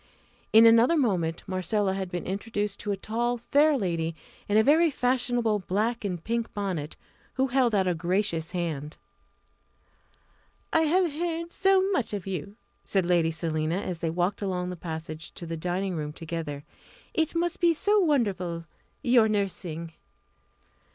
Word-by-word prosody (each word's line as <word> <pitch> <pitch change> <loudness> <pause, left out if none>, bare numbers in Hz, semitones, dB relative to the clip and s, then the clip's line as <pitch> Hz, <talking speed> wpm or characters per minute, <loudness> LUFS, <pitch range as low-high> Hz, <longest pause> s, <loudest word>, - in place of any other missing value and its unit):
In 220 +1 +8
another 230 +8 +6
moment 180 - 0
Marcella 190 +1 0
had 190 -1 -3
been 175 -1 -4
introduced 205 +1 -3
to 205 - -3
a 200 - -1
tall, 240 +4 -1
fair 285 +5 +3
lady 165 -6 -1 0.3
in 205 - +3
a 220 - +6
very 320 +6 +5
fashionable 245 -5 +1
black 215 +6 -1
and 180 -5 -3
pink 230 +1 -2
bonnet, 185 -7 -3 0.4
who 265 - +2
held 245 -3 +2
out 190 -2 +2
a 180 - +2
gracious 170 -1 -1
hand. 160 -5 -4 1.8
"I 325 - +5
have 350 -1 +2
heard 335 +1 -3
so 385 -1 +4
much 265 - 0
of 200 -4 -4
you!" 195 +1 -5 0.3
said 190 -3 0
Lady 170 -2 +3
Selina, 160 +1 -1
as 180 -4 -4
they 165 - -1
walked 180 +5 -1
along 180 -2 -2
the - - -5
passage 160 -2 -7
to 170 - -7
the 165 0 -4
dining 180 +3 -2
room 150 -2 -4
together. 160 -3 -5 0.5
"It 320 0 0
must 345 +1 0
be 345 -1 +5
so 415 +6 +3
wonderful, 195 - 0 0.4
your 240 -4 +5
nursing!" 180 -6 -2
195 Hz, 155 wpm, -27 LUFS, 170-240 Hz, 1.8 s, In